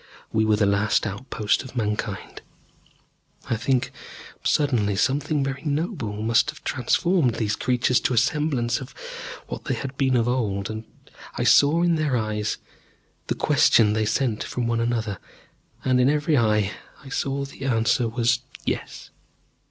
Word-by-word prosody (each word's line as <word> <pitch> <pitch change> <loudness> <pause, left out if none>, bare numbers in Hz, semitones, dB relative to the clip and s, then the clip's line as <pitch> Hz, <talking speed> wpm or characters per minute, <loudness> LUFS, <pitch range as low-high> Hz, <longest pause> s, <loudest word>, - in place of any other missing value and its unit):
We 110 0 +3
were 110 0 +4
the 105 0 +2
last 100 +3 +2
outpost 105 0 -1
of 130 -1 -11
Mankind. 105 -3 -3 1.1
I - - +3
think 125 +3 0 0.5
suddenly 120 -9 +2
something 140 +7 +1
very 135 0 -3
noble 145 - -2
must 115 +6 +3
have 150 - -8
transformed 135 +1 +1
these 110 -2 0
creatures 125 0 +2
to 125 - 0
a - - -2
semblance 125 -1 +1
of 130 - -10 0.5
what - - -7
they - - 0
had 135 -1 -5
been 130 -2 +2
of 115 0 +1
old. 110 -3 -1 0.5
I - - 0
saw, 155 +4 +5
in 170 -2 +3
their 150 -5 +1
eyes, 105 -1 -2 0.7
the - - -1
question 105 -2 +4
they 110 0 +1
sent 115 -1 0
from 125 - -3
one 115 0 0
to 115 - +1
another, 115 -5 -2 0.7
and 130 -1 +3
in 125 - +4
every 150 +1 +2
eye 105 -5 +2 0.3
I 135 - -11
saw 140 0 -2
that 135 - -11
the 135 - -5
answer 115 -1 +2
was, 120 +1 +1 0.3
Yes. - - -4
120 Hz, 160 wpm, -24 LUFS, 110-140 Hz, 1.1 s, saw